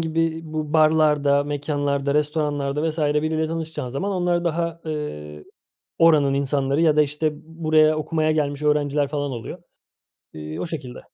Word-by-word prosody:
gibi 165 0 -1
bu 155 -1 -4
barlarda, 150 -3 +3
mekânlarda, 145 -1 -1
restoranlarda 150 0 0
vs. 155 - -7
biriyle 155 +1 +1
tanışacağın 160 -5 -4
zaman 140 +11 -3
onlar 175 -1 0
daha, 170 0 -2
eee, 75 - -6 0.6
oranın 150 -4 +5
insanları 140 +1 0
ya 155 -2 +4
da, 150 - +5
işte, 150 +1 -1
b - - -14
buraya 155 -1 +2
okumaya 155 0 0
gelmiş 145 -1 -1
öğrenciler 145 -1 +1
falan 145 -1 -3
oluyor. 115 -2 -6 0.8
Eee, 75 0 -7
o - - -2
şekilde. 140 -7 -6
150 Hz, 145 wpm, -23 LUFS, 140-160 Hz, 0.8 s, oranın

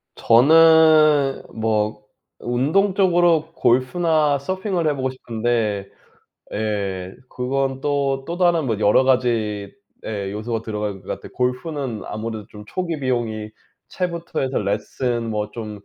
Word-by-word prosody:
저는 155 +1 +5
뭐 110 -1 -1 0.4
운동 150 +12 +1
쪽으로 175 -4 +3
골프나 145 +4 +2
서핑을 185 +1 -2
해 145 - +1
보고 130 -1 -1
싶은데 115 -5 -2 0.6
예 100 -4 -3
그건 135 +1 -2
또, 140 -1 -1
또 170 - -4
다른 175 -4 +2
뭐 110 -4 -1
여러 105 +5 +4
가지의 115 -6 0 0.6
요소가 110 +2 -3
들어갈 105 -3 -4
것 - - -21
같아요. - - -7
골프는 125 -2 -2
아무래도 110 -1 -5
좀 105 0 -12
초기 170 - -3
비용이 115 -5 -2 0.4
채부터 170 -2 -3
해서 135 0 -1
레슨 115 +3 -2
뭐 105 -1 -2
좀 105 -2 -7
125 Hz, 245 characters per minute, -21 LUFS, 110-155 Hz, 0.6 s, 저는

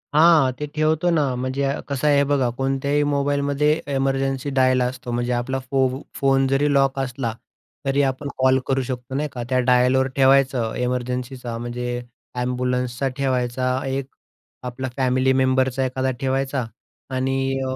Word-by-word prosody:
हां, 155 -4 +6
ते 150 - -2
ठेवतो 155 +2 +2
ना 160 -3 +3
म्हणजे 130 +2 -1 0.2
कसं 140 +1 -1
आहे 140 -1 +4
बघा 140 -3 +1
कोणत्याही 135 +2 0
मोबाईलमध्ये 140 +1 +1 0.2
एमर्जन्सी 135 0 0
डायल 130 0 +4
असतो 125 0 -3
म्हणजे 120 +1 -1
आपला 125 +2 -1
फो 130 0 +1
फोन 135 -1 +2
जरी 140 +2 +2
लॉक 135 -1 +2
असला 125 -3 -2 0.5
तरी 135 +1 +2
आपण 135 +1 -2
कॉल 130 0 +4
करू 135 0 +1
शकतो 125 0 -5
नाही 150 +2 -1
का. 120 - -5
त्या 130 -1 +2
डायलवर 125 +1 +3
ठेवायचं. 135 -4 +3
एमर्जन्सीचा 125 -1 -3
म्हणजे 120 +1 -4 0.5
एम्ब्युलन्सचा 125 +1 -1
ठेवायचा, 130 -1 0
एक 135 0 -2 0.6
आपला 125 +1 -4
फॅमिली 130 0 +2
मेंबरचा 130 0 +2
एखादा 130 +1 -1
ठेवायचा 135 -1 -1 0.5
आणि 135 +1 0
अ, 130 - -2
130 Hz, 140 wpm, -22 LUFS, 125-135 Hz, 0.6 s, हां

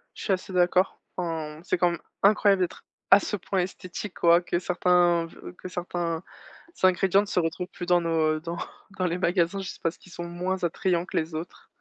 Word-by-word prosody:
Je - - -8
suis 200 - +2
assez 190 +1 -4
d'accord, 180 +1 +2 0.2
enfin, 160 -4 -3
c'est - - +1
quand 175 0 +3
même 170 - -4 0.2
incroyable 200 -2 +5
d'être, 180 - -3 0.3
à 195 - +10
ce 205 - -3
point, 195 0 -2
esthétique, 185 +1 -4
quoi, 170 0 +6
que 175 -1 -1
certains 175 -1 +3
ve 165 - -11
que 185 - -8
certains, 175 -2 -3 0.6
ingrédients 185 +1 +4
ne - - -4
se 190 - +1
retrouvent 170 +2 -2
plus 175 - -7
dans 175 0 +4
nos, 160 -2 +2
heu, - - -8
dans 170 +1 -5 0.4
dans 185 - +2
les 175 +1 -1
magasins, 180 +1 +1
juste 190 -1 -7
parce 165 -1 -1
qu'ils 185 - -18
sont 175 - -5
moins 180 +2 -3
attrayants 175 +1 0
que - - -4
les 160 0 -1
autres. 165 +3 -7
175 Hz, 210 wpm, -26 LUFS, 170-185 Hz, 0.6 s, à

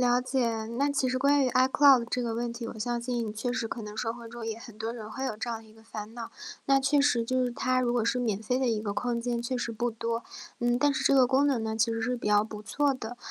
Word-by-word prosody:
了 245 0 +4
解， 245 -4 0
那 280 +1 +3
其 275 -2 +1
实 255 +1 0
关 280 +1 +4
于 255 - +1
iCloud 265 +2 +6
的 235 - -4
这 250 - -1
个 235 -1 -2
问 235 +1 -2
题， 235 -1 -6
我 225 - -8
相 240 +1 -2
信 235 -3 -2
确 245 +3 -2
实 240 -2 -1
可 225 - -5
能 210 0 -8
社 225 0 -1
会 235 -1 -10
中 235 -1 -7
也 220 -1 -3
很 230 -2 -12
多 225 +1 -3
人 220 -3 -8
会 265 +5 -4
有 255 -5 -2
这 235 +3 -4
样 225 -1 -4
的 220 - -17
一 - - -17
个 220 0 -19
烦 220 0 -8
恼。 235 -2 -6 0.4
那 275 -1 +5
确 275 +2 +3
实 245 -5 +3
就 255 +2 +1
是 250 - -1
它 255 +1 +1
如 245 -1 +1
果 240 -2 +1
是 250 +2 +1
免 215 -4 -1
费 250 +4 -1
的 255 - +2
一 220 -2 +1
个 205 -2 -3
空 235 +3 -1
间 235 0 -2
确 255 +2 -2
实 240 -1 -3
不 240 +2 -1
多。 230 +1 -3 0.4
嗯， 240 0 +2
但 285 +1 +3
是 - - -1
这 - - +4
个 260 -2 +6
功 265 +3 +3
能 245 -5 0
呢， 220 0 -2
其 230 +1 +2
实 225 - -2
是 250 +3 0
比 235 - -3
较 210 0 +4
不 215 -1 -8
错 280 +5 +1
的。 240 -1 -7
240 Hz, 345 characters per minute, -28 LUFS, 225-255 Hz, 0.4 s, iCloud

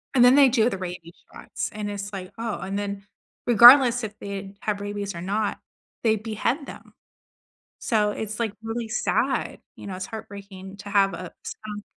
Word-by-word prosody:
And 245 - +6
then 250 +2 +7
they 275 -2 +7
do 235 -1 +3
the 195 - -4
rabies 180 -2 -7 0.2
shots, - - -5
and 210 -1 -4
it's 200 0 -5
like, 185 0 -6
"Oh" 225 -5 -3
and 195 +2 -4
then, 200 -1 -4 0.4
regardless 245 +1 +8
if 210 -1 -6
they 200 0 -7
have 205 -1 -2
rabies 205 -1 -4
or 170 - -6
not, 205 +3 -1 0.4
they 220 -1 +4
behead 225 +6 -2
them. - - -12 0.9
So 210 -2 +1
it's 215 +1 -5
like, 225 -3 -1
really 225 0 -4
sad, 240 - -1 0.2
you - - -10
know, 190 -2 -5
it's 185 - -5
heartbreaking 200 -3 -9
to 205 - -9
have 195 -1 +3
a 180 -2 -7
skunk 210 -1 -7
205 Hz, 180 wpm, -25 LUFS, 195-225 Hz, 0.9 s, regardless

